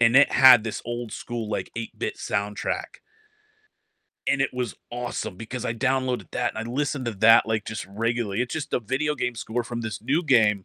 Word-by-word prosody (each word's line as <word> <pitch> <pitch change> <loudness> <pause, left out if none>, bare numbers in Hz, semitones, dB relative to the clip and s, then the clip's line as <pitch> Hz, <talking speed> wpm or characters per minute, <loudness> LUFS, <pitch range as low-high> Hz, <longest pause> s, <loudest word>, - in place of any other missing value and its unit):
and 115 +1 +5
it 140 - +7
had 130 -4 +8
this 110 - -4
old 120 -1 -4
school, 115 -3 -5
like, - - -3
8-bit 115 0 -4
soundtrack 100 0 -3 1.3
and 140 - +2
it 135 - +1
was 125 -3 -3 0.2
awesome 120 -6 -4
because 115 +4 -6
I 115 - 0
downloaded 130 +2 -1
that 120 -1 0
and 115 +1 -4
I - - -5
listened 140 0 -1
to 115 - -1
that, 110 +3 +6
like, 110 -1 -1
just 110 -3 -5
regularly. 115 +1 -1
It's 125 - -5
just 160 -2 -4
a - - +1
video 135 +7 -1
game 125 -3 -2
score 120 0 -2
from 120 0 -5
this 110 -2 -5
new 140 +8 +1
game, 110 - +3
120 Hz, 195 wpm, -25 LUFS, 110-125 Hz, 1.3 s, had